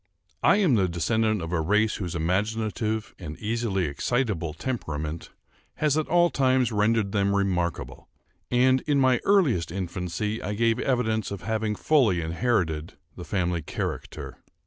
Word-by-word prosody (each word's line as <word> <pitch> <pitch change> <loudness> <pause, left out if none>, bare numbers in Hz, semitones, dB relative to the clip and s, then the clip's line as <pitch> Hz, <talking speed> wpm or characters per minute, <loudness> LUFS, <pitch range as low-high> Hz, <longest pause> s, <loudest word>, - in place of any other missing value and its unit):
I - - +5
am 195 -9 +3
the 100 -5 +3
descendant 110 +4 0
of 80 - -5
a 85 -2 +1
race 105 +6 +2
whose 90 -4 -4
imaginative 110 +5 -1
and 80 -4 -7
easily 110 -4 -1
excitable 90 - -1
temperament 80 - -4 0.5
has 150 -2 +1
at 155 -1 0
all 175 0 +3
times 130 -3 +2
rendered 105 -1 +1
them 100 -1 +1
remarkable; 90 -4 -2 0.4
and, 130 +1 +3
in 145 -2 +3
my 130 -2 +4
earliest 155 - +3
infancy, 95 +4 -3
I 105 - -3
gave 115 +2 +2
evidence 110 -5 0
of 100 -2 -6
having 110 0 -1
fully 120 - +3
inherited 85 -2 -1 0.2
the 90 - -8
family 90 -4 -1
character. 75 - -5
105 Hz, 145 wpm, -26 LUFS, 90-120 Hz, 0.5 s, I